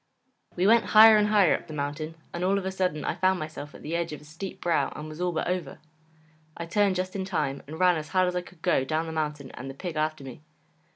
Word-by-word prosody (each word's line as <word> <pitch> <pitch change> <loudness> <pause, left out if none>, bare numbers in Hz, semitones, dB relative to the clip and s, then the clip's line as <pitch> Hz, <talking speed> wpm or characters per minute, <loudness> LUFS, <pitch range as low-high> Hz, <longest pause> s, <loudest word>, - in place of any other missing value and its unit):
We 180 - +1
went 230 +2 +5
higher 220 0 +10
and 210 0 +4
higher 205 -5 +4
up - - -3
the 155 - -7
mountain, 150 +3 -4 0.2
and 170 - -3
all 195 +2 +2
of 195 - -3
a 190 - -1
sudden 180 -5 -1
I - - 0
found 185 +1 +2
myself 155 -2 -7
at - - -13
the 160 +3 -3
edge 170 -1 -1
of 150 - -7
a - - -17
steep 165 +6 -8
brow 170 -1 +1
and 150 - -7
was 155 +2 -8
all 180 0 +1
but 160 - -2
over. 180 -6 -3 0.8
I 170 - -4
turned 195 +2 +2
just 185 +1 -3
in 195 - -2
time, 150 -7 -2
and 160 +3 -8
ran 180 -2 +4
as 155 -1 -5
hard 185 -1 +2
as 180 - -2
I 180 - 0
could 175 -1 -17
go 130 - +2
down 155 +4 -1
the 160 - -5
mountain 150 -3 -3
and 130 +2 -8
the 135 - -8
pig 175 +2 -6
after 155 -1 -1
me. 130 +1 -10
170 Hz, 270 wpm, -27 LUFS, 155-185 Hz, 0.8 s, higher